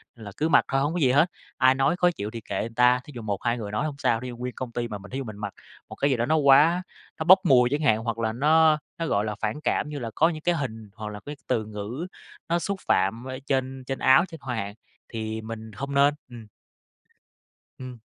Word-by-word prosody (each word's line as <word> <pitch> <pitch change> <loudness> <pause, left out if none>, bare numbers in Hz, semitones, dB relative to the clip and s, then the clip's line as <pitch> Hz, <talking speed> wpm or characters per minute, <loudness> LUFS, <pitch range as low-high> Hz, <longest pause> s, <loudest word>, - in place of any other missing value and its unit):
nên 110 - -12
là 100 - -7
cứ 155 - 0
mặc 145 - +5
thôi 135 0 +1
hông 145 +4 0
có 180 - -1
gì 130 -5 +4
hết, 155 +7 +3 0.3
ai 130 0 +5
nói 135 +5 +2
khó 180 0 +3
chịu 105 -10 -5
thì 115 - -7
kệ - - -4
người 115 - -2
ta. 125 +1 +5
Thí - - -11
dụ 120 - -6
1-2 110 +3 -1
người 105 -3 -5
nói 105 +8 -1
không 150 -2 -3
sao, 120 -5 +1
thí 125 - -6
dụ 120 -1 -7
nguyên 125 0 -5
công 130 -2 -5
ty 120 0 -3
mà 105 - -5
mình 100 +1 -13
thí 130 - -4
dụ 135 - -3
mình 110 -3 -8
mặc 100 -2 -5 0.4
một - - -8
cái 140 - +1
gì 130 - +1
đó 120 - 0
nó 155 - +2
quá 155 +5 +5 0.4
nó 160 - 0
bốc 185 +3 +8
mùi 125 -5 +5
chẳng 145 +3 -1
hạn, 110 -8 +3
hoặc 115 -1 -3
là 110 -1 -1
nó 155 +4 +4 0.2
nó, 165 - -2
gọi 105 -5 +1
là, 105 -1 -3
phản 110 +8 -2
cảm 150 - 0
như 150 -1 -5
là 115 -3 -4
có 160 +2 +4
những 155 -2 -6
cái 175 +2 +1
hình 115 -8 -5
hoặc 110 -2 -6
là 105 - -7
cái 145 - -6
từ 110 -4 0
ngữ 110 - -6 0.4
nó 170 +1 +2
xúc 200 +1 -3
phạm 105 +6 +1
ở 130 0 -5
trên 130 -1 -1
trên 135 - -3
áo 130 +7 +5
trên 165 -3 -11
hoa 125 -2 -3
hạn 100 -2 -4 0.4
thì 110 -1 -4
mình 110 0 -8
hông 140 +5 -5
nên. 140 +1 +4 0.2
Ừm. 115 -3 -11 1.3
Ừm. 130 -2 -8
125 Hz, 270 wpm, -25 LUFS, 110-145 Hz, 1.3 s, bốc